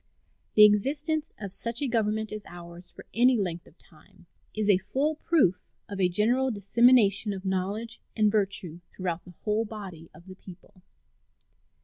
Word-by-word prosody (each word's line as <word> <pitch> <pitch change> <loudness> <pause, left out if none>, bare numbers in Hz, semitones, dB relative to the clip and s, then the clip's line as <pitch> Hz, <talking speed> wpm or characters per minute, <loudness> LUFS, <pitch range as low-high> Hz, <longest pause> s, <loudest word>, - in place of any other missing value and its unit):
The 210 - +9
existence 295 +9 +1
of 200 -3 -6
such 230 +3 -1
a 285 - -1
government 220 -2 -1
as 215 -1 -6
ours 175 0 -11
for - - -14
any 245 +2 +4
length 175 -4 -3
of - - -21
time - - -21 0.3
is 215 -1 -2
a 200 -3 +4
full 265 +11 -1
proof 295 - +1 0.3
of 200 -1 -5
a 180 - +3
general 240 +8 +1
dissemination 210 -1 +3
of 190 0 -8
knowledge 195 +5 -3
and 215 -2 +3
virtue 195 -5 -2
throughout 180 -2 -4
the 180 -1 -14
whole 215 +1 0
body 195 -7 -9
of 170 - -17
the 190 - -10
people. 185 0 -15
210 Hz, 160 wpm, -27 LUFS, 185-230 Hz, 0.3 s, The